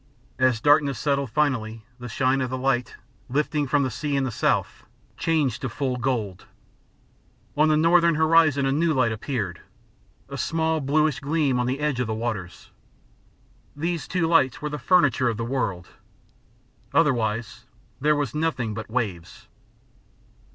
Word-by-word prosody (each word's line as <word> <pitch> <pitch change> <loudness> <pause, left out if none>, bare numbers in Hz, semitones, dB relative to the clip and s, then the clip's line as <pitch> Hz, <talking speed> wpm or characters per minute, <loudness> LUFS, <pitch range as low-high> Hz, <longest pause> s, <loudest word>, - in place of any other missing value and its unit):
As 130 -3 +3
darkness 145 +1 +3
settled 140 -3 0
finally, 115 -5 -1
the 120 0 -7
shine 130 +3 +1
of 130 - -2
the 130 - -3
light, 125 -2 -1 0.3
lifting 145 +2 0
from 140 +1 +2
the 130 - -2
sea 145 +5 -3
in 135 - +1
the 130 - -2
south, - - -1 0.3
changed 150 -7 0
to 130 - -3
full 130 +2 -2
gold. 120 -7 -3 1.1
On 155 +1 +4
the 155 - +3
northern 170 +1 +4
horizon 160 -3 +4
a 135 - +1
new 160 +2 +1
light 125 -3 +2
appeared, 110 - -4 0.7
a - - -7
small 160 0 0
bluish 150 +1 +1
gleam 145 -3 0
on 125 - 0
the 130 +2 -2
edge 150 -4 -1
of 125 - -1
the 110 - -2
waters. 110 -6 -5 1.0
These 165 +2 -3
two 180 -2 0
lights 160 -7 +3
were 150 - -4
the 150 0 -5
furniture 145 -8 +3
of 115 - -3
the 115 - -3
world. 110 -9 -3 1.1
Otherwise 115 -7 0 0.3
there 150 +2 +3
was 145 0 -2
nothing 150 -8 -1
but 110 +1 -7
waves. 105 -8 -4
135 Hz, 155 wpm, -24 LUFS, 120-150 Hz, 1.1 s, On